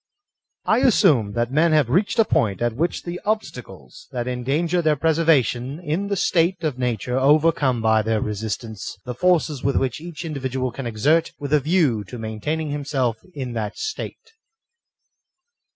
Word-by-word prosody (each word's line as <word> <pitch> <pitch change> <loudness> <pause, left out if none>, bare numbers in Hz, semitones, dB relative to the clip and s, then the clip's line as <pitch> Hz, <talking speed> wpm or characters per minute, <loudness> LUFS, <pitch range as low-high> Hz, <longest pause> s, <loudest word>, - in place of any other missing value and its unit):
I 220 - +3
ASSUME 130 - +3
that 120 +2 -1
men 155 +3 +3
have 150 -5 +4
reached 190 +8 +1
a 225 - +5
point 100 - +1
at 120 -1 0
which 165 +7 -1
the 175 +1 -6
obstacles 185 - -5
that 120 -2 -3
endanger 145 +8 0
their 155 -2 +2
preservation 150 -4 +1
in 175 +4 -2
the 200 - -1
state 175 -1 +1
of 145 -5 -2
nature 125 +1 -1
overcome 140 -4 +3
by 110 0 +4
their 110 0 0
resistance 105 -1 -4
the 125 - -4
forces 160 -4 +1
which 135 -1 0
each 170 -1 -7
individual 130 -4 -3
can 125 +1 -6
exert 145 +9 +1
with 145 0 -4
a 150 - +6
view 145 - +1
to 125 - -9
main 110 -1 -6
taining 155 +3 -2
himself 140 -5 -1 0.2
in 130 -4 -4
that 110 -3 -4
state. 435 +1 -6
140 Hz, 160 wpm, -22 LUFS, 120-165 Hz, 0.2 s, a